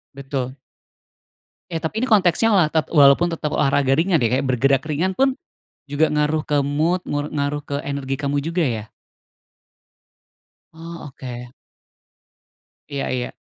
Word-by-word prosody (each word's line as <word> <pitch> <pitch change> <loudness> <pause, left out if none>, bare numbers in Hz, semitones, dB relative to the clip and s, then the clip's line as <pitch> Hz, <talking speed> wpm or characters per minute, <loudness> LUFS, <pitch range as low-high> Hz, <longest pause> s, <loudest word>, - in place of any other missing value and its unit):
Betul. 135 -1 -4 1.1
Ya, 165 0 -3
tapi 190 +7 -2
ini 255 - 0
konteksnya 205 -1 +3
olah 175 -6 +4
tep 160 -1 0
walaupun 145 +2 +5
tetap 150 -2 -4
olahraga 140 -1 +2
ringan, 165 0 +2
ya. 125 +3 +2
Kayak - - -2
bergerak 135 +1 +2
ringan 160 +5 0
pun 265 +7 +1 0.5
juga 145 +3 +1
ngaruh 150 +1 +1
ke 145 -1 0
mood, 155 +6 0
ngu 145 +1 -2
ngaruh 145 0 -2
ke 140 0 -4
energi 135 -1 -3
kamu 140 0 -1
juga, 165 +1 0
ya? 110 -3 -4 1.8
Oh 165 -1 -9
oke. 125 -2 -8 1.4
Iya 140 -1 -3
iya. 125 -1 -2
145 Hz, 140 wpm, -21 LUFS, 135-165 Hz, 1.8 s, walaupun